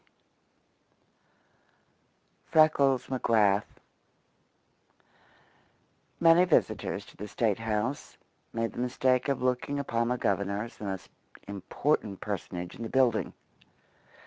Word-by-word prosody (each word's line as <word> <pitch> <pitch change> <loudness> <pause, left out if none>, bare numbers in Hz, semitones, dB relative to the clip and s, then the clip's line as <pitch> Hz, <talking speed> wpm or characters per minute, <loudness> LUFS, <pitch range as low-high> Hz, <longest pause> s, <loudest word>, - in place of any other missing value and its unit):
IV - - -40 2.5
FRECKLES 140 -5 +4
M'GRATH 110 -5 +2 2.5
Many 165 +1 +6
visitors 175 - 0
to - - -17
the 105 - -7
State 110 0 0
house 110 +4 -3 0.3
made 115 0 -2
the - - -7
mistake 125 +1 +1
of 135 -2 -1
looking 130 +3 0
upon 115 -4 -1
the 125 +1 0
Governor 100 -1 0
as 115 - -10
the 105 - -7
most 95 -2 -5 0.4
important 100 +1 -1
personage 90 -3 -5
in - - -11
the 115 - -4
building. 125 -4 +2
115 Hz, 105 wpm, -29 LUFS, 105-130 Hz, 2.5 s, Many